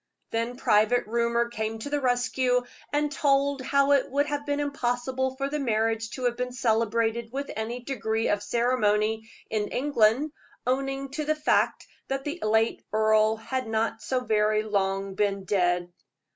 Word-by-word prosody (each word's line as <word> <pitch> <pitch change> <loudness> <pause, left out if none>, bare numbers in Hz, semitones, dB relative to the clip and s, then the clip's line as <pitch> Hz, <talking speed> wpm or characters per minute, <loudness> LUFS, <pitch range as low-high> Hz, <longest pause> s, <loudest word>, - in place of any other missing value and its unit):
Then 230 +2 -2
private 220 0 +3
rumor 235 +1 +1
came 220 -1 -3
to 220 +6 -6
the 290 -1 0
rescue, 250 0 +1 0.3
and 295 0 +1
told 280 -1 +2
how 280 +1 +2
it 280 -2 +3
would 285 +2 +1
have 290 0 -3
been 285 0 0
impossible 260 -2 -1
for 275 +1 -2
the 300 +2 -2
marriage 225 -3 0
to 255 - -6
have 245 -1 +1
been 250 0 -3
celebrated 230 -1 0
with 280 +2 -4
any 225 +3 -4
degree 225 -4 -1
of 205 - +1
ceremony 220 -2 +1 0.2
in 210 -1 0
England, 270 +1 +2 0.3
owing 270 +2 -1
to 300 +3 -3
the 310 +1 +1
fact 305 - +1 0.2
that 270 0 -2
the 300 +5 -4
late 220 +1 +2
earl 215 0 +3
had 255 +3 -4
not 225 0 -1
so 255 -1 -1
very 215 -2 +2
long 195 -2 -1
been 200 -1 0
dead. 175 -2 0
235 Hz, 160 wpm, -27 LUFS, 220-270 Hz, 0.3 s, private